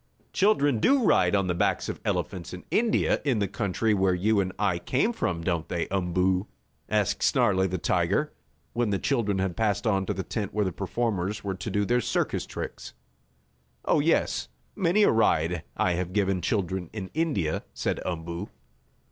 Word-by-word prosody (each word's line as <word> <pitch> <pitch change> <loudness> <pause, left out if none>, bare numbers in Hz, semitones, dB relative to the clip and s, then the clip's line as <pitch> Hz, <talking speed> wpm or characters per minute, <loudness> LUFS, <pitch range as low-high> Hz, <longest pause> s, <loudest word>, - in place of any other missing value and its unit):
"Children 145 - +3
do 270 - +4
ride 90 - +4
on 100 -1 +2
the 90 - 0
backs 85 - 0
of - - -5
elephants 90 -1 -2
in 90 - -12
India, 230 0 +2
the 115 -8 +1
country 105 +2 0
where 95 -2 +2
you 105 +4 +2
and 95 -1 0
I 95 -5 +1
came 135 - 0
from, 85 - -2
don't 85 -3 -1
they, 85 -1 -1
Umboo?" 90 +1 +1 0.4
asked - - +1
Snarlie, 95 0 +3
the 95 - -2
tiger, - - 0 0.4
when 120 -2 0
the 100 - +1
children 110 -5 0
had 95 -2 -1
passed 105 -2 0
on 95 -3 +1
to 105 - 0
the 95 - -3
tent 105 -1 -4
where 105 -1 +2
the 95 - -1
performers 100 +1 -2
were 100 -1 -2
to 90 +1 -5
do 105 -1 0
their 120 +3 +2
circus - - -1
tricks. - - -7 0.9
"Oh, - - +3
yes, - - +1 0.3
many 195 +2 +3
a - - +5
ride 90 -6 +2 0.2
I 90 - +2
have 90 +1 -2
given 95 -3 +1
children 95 -4 -1
in 100 -4 -6
India," 145 - 0
said - - -1
Umboo. 85 +2 -4
95 Hz, 175 wpm, -27 LUFS, 90-110 Hz, 0.9 s, a